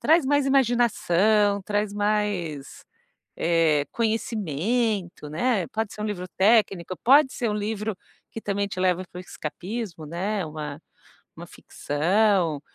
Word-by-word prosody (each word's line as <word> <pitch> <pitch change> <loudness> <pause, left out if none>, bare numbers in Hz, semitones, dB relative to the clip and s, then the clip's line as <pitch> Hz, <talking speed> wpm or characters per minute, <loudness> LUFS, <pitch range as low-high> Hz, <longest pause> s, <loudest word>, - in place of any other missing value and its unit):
traz 320 -2 +4
mais 285 -1 +2
imaginação, 215 -6 +2
traz 205 +1 -1
mais, 205 -8 -2 0.5
eh, 165 -3 +2
conhecimento, 215 - -1
né. 190 +2 0
Pode 220 -1 -3
ser 210 - -6
um - - -2
livro 185 -4 -4
técnico, 195 -4 +2
pode 270 +2 +6
ser 235 - -2
um - - -1
livro 210 -1 -3 0.3
que 225 - -7
também 200 -1 -1
te 185 - -5
leva 185 0 +1
para 180 - -9
o - - -7
escapismo, 180 0 -6
né, 190 +5 -2
uma 150 -1 -6 0.6
uma - - -9
ficção. 175 0 0
205 Hz, 130 wpm, -25 LUFS, 170-220 Hz, 0.6 s, pode